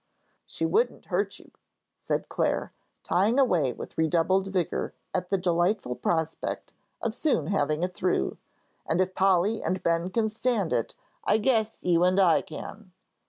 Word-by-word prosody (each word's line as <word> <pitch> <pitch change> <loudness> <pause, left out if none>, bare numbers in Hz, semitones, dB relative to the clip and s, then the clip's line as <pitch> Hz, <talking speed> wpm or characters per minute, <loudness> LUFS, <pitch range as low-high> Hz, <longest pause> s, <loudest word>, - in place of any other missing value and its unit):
"She - - -2
wouldn't 465 +3 +1
hurt - - 0
you," - - -17 0.5
said - - -2
Clare, - - -1 0.3
tying 205 +8 +2
away 180 - +3
with - - -9
redoubled 175 +4 +2
vigor 185 -4 -2 0.2
at 180 0 -2
the 195 - +2
delightful 175 - +1
prospect 160 +4 -2 0.3
of 230 - 0
soon 290 +5 +1
having 155 -4 0
it 180 0 -1
through; 180 - 0 0.5
"and 160 - +1
if 185 0 +1
Polly 195 +3 +2
and 185 0 -2
Ben 170 +1 +1
can 220 +2 +1
stand 220 -4 0
it, - - -1 0.3
I 410 - +3
guess 220 -1 0
you 175 -1 +3
and 185 +2 +3
I 180 -4 +5
can." 185 +5 -9
185 Hz, 155 wpm, -27 LUFS, 170-215 Hz, 0.5 s, I